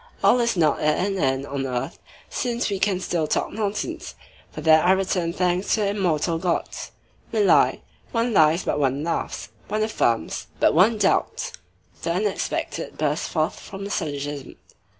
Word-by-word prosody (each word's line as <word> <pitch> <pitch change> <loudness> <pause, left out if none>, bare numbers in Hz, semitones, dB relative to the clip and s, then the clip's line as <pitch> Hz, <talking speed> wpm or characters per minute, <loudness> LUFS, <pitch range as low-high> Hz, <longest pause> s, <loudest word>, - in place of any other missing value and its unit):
All 250 - +5
is 235 -4 +1
not 155 -4 +3
at 155 +4 +2
an 195 -1 -2
end 135 -2 +1
on 140 -1 -3
earth 125 +1 -3 0.3
since 240 -4 -2
we 195 - -1
can 195 -2 +1
still 170 -4 -1
talk - - 0
nonsense. 220 - -3 0.3
For - - -8
that 160 -1 +6
I 185 - +5
return 185 -3 0
thanks 180 +2 +1
to 220 - -1
the 200 - +1
immortal 170 -5 0
gods. 175 -1 -2 0.4
We 220 - +1
lie. 200 - +4 0.3
One 230 0 0
lies, 160 0 +4
but 150 - -1
one 140 +1 +1
laughs. 165 0 -3 0.2
One 215 +1 0
affirms, 120 - 0
but - - +4
one 195 +8 +5
doubts. - - +1 0.5
The 170 - -1
unexpected 200 +2 -2
bursts - - 0
forth - - -1
from 195 0 -8
the 200 - -5
syllogism. 145 -4 -4
180 Hz, 170 wpm, -24 LUFS, 150-205 Hz, 0.5 s, that